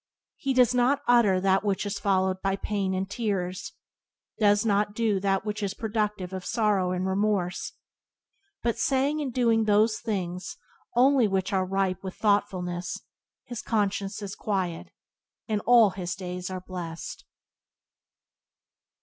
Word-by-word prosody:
He 270 -2 -1
does 250 -1 +5
not 250 +3 +2
utter 230 -6 +5
that 190 +1 +2
which 200 -1 0
is 200 0 -3
followed 190 -1 +1
by 195 0 +1
pain 195 -1 -2
and 190 +1 -2
tears; 195 -4 -3 0.7
does 205 0 +4
not 205 -1 +1
do 220 -4 +1
that 195 +1 0
which 210 0 -3
is 200 -1 -2
productive 210 -4 -2
of 185 -1 -5
sorrow 210 -4 +1
and 185 0 -1
remorse. 190 -2 0 0.9
But, 235 -1 0
saying 280 +3 +1
and 275 -3 -2
doing 230 -3 +2
those 215 +1 +3
things 180 -4 -4 0.4
only 255 -1 +5
which 190 0 -1
are 185 -1 +1
ripe 190 -1 0
with 190 -1 -6
thoughtfulness, 180 -4 0 0.5
his 240 -2 -6
conscience 200 -2 -1
is 195 -1 -5
quiet, 185 -5 -2 0.6
and 215 -2 0
all 235 -4 +7
his 180 -2 -4
days 180 -1 -5
are 185 -1 -5
blessed. 175 -3 -7
200 Hz, 140 wpm, -27 LUFS, 185-220 Hz, 0.9 s, all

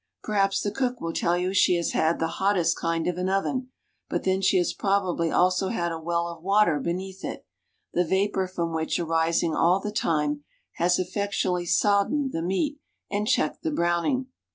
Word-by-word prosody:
Perhaps 195 -2 +1
the 205 - -1
cook 250 -1 -1
will 165 0 -4
tell 175 +1 +1
you 180 +1 -1
she 185 -2 +4
has 170 -1 -1
had 160 +1 +1
the 165 - 0 0.2
"hottest 180 -4 +2
kind 165 -1 -1
of 180 0 -1
an 185 +1 0
oven;" 250 +7 -1 0.4
but - - -2
then 190 0 +1
she 190 0 +3
has 175 - +1
probably 190 -4 0
also 185 +3 +2
had 170 -4 -1
a 165 - -4
well 170 +1 -1
of 170 -1 -8
water 195 -2 +3
underneath 185 +5 -4
it, - - -6 0.5
the 180 - +3
vapor 190 +2 0
from 170 -3 -3
which, 160 0 -1
arising 165 0 +1
all 175 +4 +3
the 210 +1 -4
time, 150 -6 0 0.3
has 175 +1 +3
effectually 185 -1 -1
soddened 205 - +2
the 165 - -3
meat, 280 - -1 0.3
and 205 +1 -1
checked 155 - +1
the - - -1
browning. 175 - 0
180 Hz, 185 wpm, -26 LUFS, 170-200 Hz, 0.5 s, she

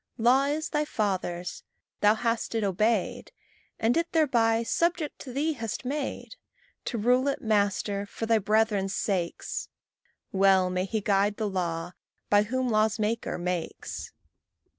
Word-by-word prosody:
Law 250 +4 +4
is 300 +2 -1
Thy 300 0 +1
father's; 185 -8 -2 0.4
thou 210 +1 +5
hast 230 0 -1
it 225 - +1
obeyed, 205 +1 0 0.5
And 225 +2 +2
it 335 0 0
thereby 235 -8 +3
subject 335 +5 0
to 260 - -8
thee 295 +5 0
hast 225 -2 -5
made 285 - -4 0.5
To 240 - -2
rule 250 +5 +3
it, 280 - 0
master, 205 -1 +1
for 225 - -5
thy 225 0 +3
brethren's 210 -1 +1
sakes: 180 -5 -2 0.6
Well 190 -2 +4
may 185 0 0
he 215 +2 -2
guide 200 +1 +2
the 220 - -1
law 175 -3 -2 0.4
by 205 0 +6
whom 255 +4 -1
law's 215 0 +2
maker 220 +1 -1
makes. 175 -1 -4
220 Hz, 140 wpm, -27 LUFS, 195-250 Hz, 0.6 s, by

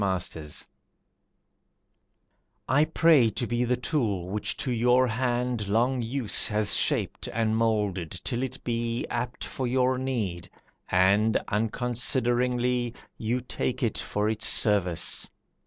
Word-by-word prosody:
A 95 -1 +1
Petition 80 -4 -5 2.0
I 140 +4 +4
pray 155 -6 +4
to 115 +3 -3
be 120 +1 -1
the 125 +1 +1
tool 110 - -1
which 105 +1 -1
to 130 - -1
your 125 +2 +3
hand 120 -2 -1
Long 120 +5 +1
use 120 -1 +2
has 105 0 +2
shaped - - 0
and 110 -1 0
moulded 105 -6 0
till 120 - -4
it 130 0 -5
be 115 0 -2
Apt 125 0 -3
for 130 - -4
your 130 +1 +1
need, 105 -10 -3 0.4
and, 100 +4 +3
unconsideringly, 120 +2 0 0.2
You 120 +3 -1
take 125 +1 -3
it 115 - 0
for 105 +1 -1
its 110 0 +1
service. 90 -5 +2
120 Hz, 125 wpm, -27 LUFS, 105-125 Hz, 2.0 s, I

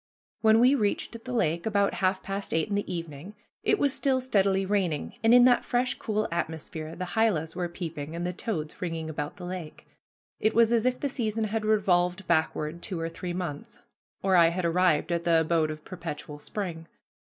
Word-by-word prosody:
When 220 0 +5
we 250 +3 +6
reached 225 -1 -1
the 255 - -5
lake, 170 -6 0
about 200 -2 +2
half 190 0 0
past 195 -2 -3
eight 160 +3 +1
in - - -2
the 200 -2 -1
evening, 170 +2 -6 0.3
it 420 - +2
was 285 -7 +2
still 265 -2 +1
steadily 195 -6 +2
raining, 185 -7 -1
and 225 - +5
in 245 0 +8
that 245 -1 +5
fresh, 245 0 0
cool 215 0 -1
atmosphere 160 -1 -4
the 185 - -4
hylas 180 -8 +1
were 175 -1 -2
peeping 165 -3 -6
and 170 +1 -3
the 180 - -2
toads 165 -6 -4
ringing 165 -3 -3
about 150 +3 -5
the 180 - -7
lake. 175 -3 -7 0.5
It 215 - +1
was 230 0 +5
as 235 +1 +3
if 255 0 0
the 285 - +1
season 225 -4 -2
had 215 0 -2
revolved 190 -3 +2
backward 160 0 0
two 180 -2 -3
or 165 0 -2
three 175 +1 -5
months, 175 -5 -5 0.5
or 190 -1 +3
I 170 -2 +7
had 170 +1 -1
arrived 170 -1 +2
at 170 0 0
the 165 -1 +4
abode 160 -1 +1
of 155 0 -7
perpetual 150 -4 -7
spring. 165 -2 -5
185 Hz, 200 wpm, -27 LUFS, 165-215 Hz, 0.5 s, in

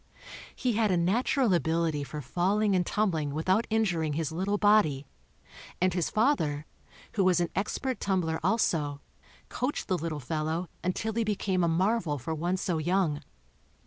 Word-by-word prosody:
He 250 -3 0
had 215 0 +2
a 180 - +2
natural 225 +6 +2
ability 165 -3 +1
for 150 +1 -6
falling 195 - +1
and 180 - +3
tumbling 165 -8 -1
without 185 +8 +1
injuring 180 -9 +1
his 155 0 -2
little 190 +5 -1
body 205 -10 +3 0.7
and 185 0 +2
his 175 -2 0
father, 160 - +1 0.5
who 205 - +1
w 185 - +4
r - - +6
as 180 -1 +3
an 175 -1 -1
expert 240 +6 -2
tumbler 180 -5 0
also, 150 -10 +1 0.5
coached 255 +4 -2
the 185 -2 0
little 160 -2 -3
fellow' 160 +5 -2
until 205 +5 -1
he 230 +1 +1
became 195 -3 0
a - - +3
marvel 175 -2 +1
for 140 +5 -4
one 175 +4 -1
so 175 -3 -1
young. 170 -2 +1
180 Hz, 165 wpm, -29 LUFS, 160-205 Hz, 0.7 s, r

